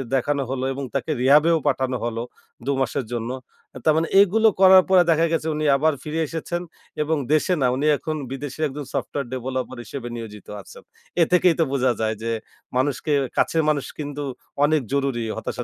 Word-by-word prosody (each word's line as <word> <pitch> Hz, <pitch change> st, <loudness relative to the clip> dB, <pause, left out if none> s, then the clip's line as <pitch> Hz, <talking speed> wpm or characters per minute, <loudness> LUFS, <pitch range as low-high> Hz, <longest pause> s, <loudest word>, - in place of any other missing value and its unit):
দেখানো 140 Hz, +2 st, 0 dB
হলো। 130 Hz, -1 st, -2 dB
এবং 140 Hz, +1 st, -5 dB
তাকে 140 Hz, +4 st, -1 dB
রিহ্যাবেও 150 Hz, +5 st, +5 dB
পাঠানো 130 Hz, -2 st, 0 dB
হলো 115 Hz, 0 st, -3 dB, 0.4 s
দু-মাসের 135 Hz, -2 st, -1 dB
জন্য। 120 Hz, +1 st, -3 dB, 0.5 s
তার 155 Hz, -, +5 dB
মানে 165 Hz, +1 st, +1 dB
এগুলো 220 Hz, +3 st, +4 dB
করার 190 Hz, -1 st, +8 dB
পরে 185 Hz, -2 st, +6 dB
দেখা 165 Hz, +1 st, +3 dB
গেছে 160 Hz, -1 st, -1 dB
উনি 155 Hz, 0 st, -2 dB
আবার 155 Hz, +2 st, +2 dB
ফিরে 155 Hz, +1 st, -3 dB
এসেছেন 170 Hz, +2 st, -4 dB, 0.4 s
এবং 160 Hz, +1 st, 0 dB, 0.2 s
দেশে 155 Hz, +4 st, +2 dB
না, 125 Hz, -, +4 dB
উনি 145 Hz, +3 st, 0 dB
এখন 155 Hz, +1 st, -4 dB, 0.2 s
বিদেশে 140 Hz, +2 st, -6 dB
একজন 145 Hz, 0 st, -7 dB
সফটওয়্যার 140 Hz, -4 st, -3 dB
ডেভেলপার 130 Hz, 0 st, -4 dB
হিসেবে 125 Hz, -4 st, -6 dB
নিয়োজিত 105 Hz, -3 st, -9 dB
আছেন। -, -, -14 dB, 0.4 s
এ -, -, +8 dB
থেকেই 180 Hz, -1 st, +5 dB
তো -, -, +5 dB
বোঝা 130 Hz, -2 st, +2 dB
যায় 110 Hz, 0 st, 0 dB
যে 115 Hz, -, -1 dB, 0.5 s
মানুষকে 145 Hz, +3 st, 0 dB, 0.2 s
কাছের 160 Hz, -1 st, +2 dB
মানুষ 145 Hz, -3 st, 0 dB
কিন্তু 145 Hz, 0 st, -4 dB, 0.4 s
অনেক 155 Hz, -1 st, +2 dB
জরুরি 135 Hz, -4 st, 0 dB
হতাশা -, -, -4 dB
140 Hz, 175 wpm, -23 LUFS, 130-160 Hz, 0.5 s, করার